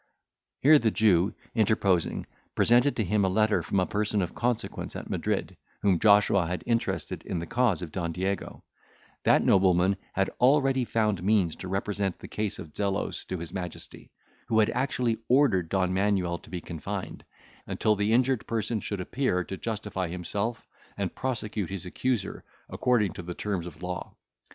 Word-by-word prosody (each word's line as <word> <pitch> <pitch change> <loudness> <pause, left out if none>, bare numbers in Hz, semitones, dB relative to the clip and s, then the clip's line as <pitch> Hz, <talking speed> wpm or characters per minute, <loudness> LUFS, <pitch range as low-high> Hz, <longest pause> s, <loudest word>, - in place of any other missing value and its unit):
Here 150 +2 +7
the 115 - +2
Jew 100 -4 +3 0.2
interposing, 100 -6 +1 0.3
presented 120 +4 +4
to 115 - 0
him 100 +2 +1
a 95 - +3
letter 110 +2 +2
from 100 - 0
a 90 - +2
person 105 0 0
of 85 - -5
consequence 120 -1 -2
at - - -6
Madrid, - - -1 0.3
whom 95 -4 +3
Joshua 100 -3 +5
had 90 +1 -3
interested 115 -1 -1
in 90 - -3
the 85 - -3
cause 115 -5 +1
of 80 - -6
Don 85 -2 -2
Diego; 95 +4 -3 0.6
that - - +5
nobleman 95 0 +4 0.2
had 95 0 +1
already 135 -1 +4
found 105 -5 0
means 95 -4 +2
to 95 - -7
represent 95 0 -1
the - - -10
case 105 -2 -3
of 75 - -10
Zelos 100 -1 -2
to 95 - -4
his 85 -1 -7
Majesty, 90 -3 -7 0.4
who 115 -2 +1
had 110 -1 +4
actually 125 -3 0
ordered 120 - +3
Don 95 -2 +1
Manuel 95 -3 +1
to - - -17
be 90 -2 -5
confined, 80 -2 -6 0.4
until 110 - +1
the 105 +1 0
injured 125 +1 +2
person 115 0 -1
should 100 -2 -4
appear 90 -3 0
to 95 - -6
justify 105 -3 -3
himself, 100 +7 -3 0.3
and - - -2
prosecute 110 -7 -3
his 95 -2 -5
accuser 115 +2 -2 0.3
according 115 -7 +1
to - - -7
the 90 0 -6
terms 95 -5 -3
of 85 +1 -11
law. 90 0 -5
100 Hz, 170 wpm, -28 LUFS, 90-115 Hz, 0.6 s, Here